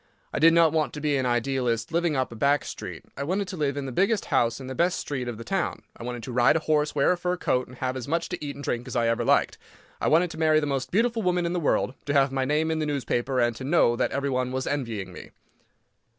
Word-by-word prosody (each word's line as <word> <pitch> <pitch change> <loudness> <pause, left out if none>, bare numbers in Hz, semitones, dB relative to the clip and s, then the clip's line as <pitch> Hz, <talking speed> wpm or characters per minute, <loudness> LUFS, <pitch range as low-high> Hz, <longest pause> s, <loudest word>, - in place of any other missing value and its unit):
I - - -1
did 165 +2 +6
not 165 -2 +5
want 155 -2 0
to 150 - -6
be 150 -1 0
an 130 -2 0
idealist 120 -1 0
living 170 -2 +1
up 130 -2 -1
a - - -8
back 140 +5 +2
street. 90 -6 -7
I - - -6
wanted 185 +7 -1
to 185 - -5
live 145 -4 -1
in 140 - -3
the 135 - -4
biggest 200 - +1
house 115 -2 +2
in 135 - -8
the 130 - -5
best 175 +6 +1
street 130 -4 -4
of 120 -2 -4
the 115 - -7
town. - - -2
I - - -14
wanted 120 0 -5
to 130 - -6
ride 120 +4 +4
a - - +3
horse, 150 -1 +1
wear 140 +4 +3
a 180 - +1
fur 180 0 -1
coat, 125 -6 0
and 125 - -13
have 130 0 -2
as 130 -3 -5
much 165 +3 0
to 180 -4 -5
eat 145 -1 -4
and 140 - -9
drink 120 -1 -2
as 125 - -6
ever 115 -1 +1
I - - -2
liked. - - +2 0.4
I - - +1
wanted 170 +2 +3
to 160 - -8
marry 155 -1 +4
the 150 - -1
most 135 -2 -2
beautiful 230 +3 +1
woman 180 -2 +1
in 170 - -1
the 180 - 0
world, 145 -4 +1
to 145 - -1
have 140 -1 +3
my 135 -1 0
name 155 +3 +1
in 160 - -1
the 155 - -1
newspaper, 130 -2 -1
and 120 -1 +2
to 130 - -7
know 135 -4 +3
that - - 0
everybody 130 -2 -1
was 130 +1 -3
envying 115 -10 -3
me. - - -10
140 Hz, 280 wpm, -26 LUFS, 125-160 Hz, 0.4 s, did